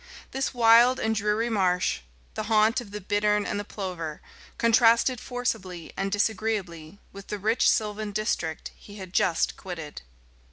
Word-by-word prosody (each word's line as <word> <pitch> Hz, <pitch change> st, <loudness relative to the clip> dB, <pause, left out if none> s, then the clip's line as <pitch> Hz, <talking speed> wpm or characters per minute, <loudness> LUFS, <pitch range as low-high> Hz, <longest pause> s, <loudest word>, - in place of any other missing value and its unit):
This 270 Hz, 0 st, -2 dB
wild 240 Hz, +1 st, +5 dB
and 220 Hz, -, 0 dB
dreary 210 Hz, +2 st, 0 dB
marsh, 185 Hz, -, +1 dB, 0.3 s
the 215 Hz, -, -4 dB
haunt 220 Hz, +3 st, +3 dB
of 225 Hz, -, -11 dB
the 210 Hz, +1 st, -6 dB
bittern 210 Hz, +1 st, +1 dB
and 205 Hz, -, -2 dB
the -, -, -3 dB
plover, 180 Hz, -7 st, -6 dB, 0.4 s
contrasted 230 Hz, +2 st, +4 dB
forcibly 210 Hz, -9 st, -4 dB
and 195 Hz, 0 st, -2 dB
disagreeably 205 Hz, -6 st, -2 dB, 0.2 s
with 200 Hz, 0 st, -11 dB
the 210 Hz, -, -4 dB
rich 220 Hz, +4 st, +2 dB
sylvan 210 Hz, -1 st, -1 dB
district 185 Hz, -6 st, -2 dB
he 205 Hz, -, -14 dB
had 190 Hz, -3 st, -9 dB
just 170 Hz, -4 st, +1 dB
quitted. 165 Hz, -5 st, -8 dB
210 Hz, 150 wpm, -26 LUFS, 185-225 Hz, 0.4 s, wild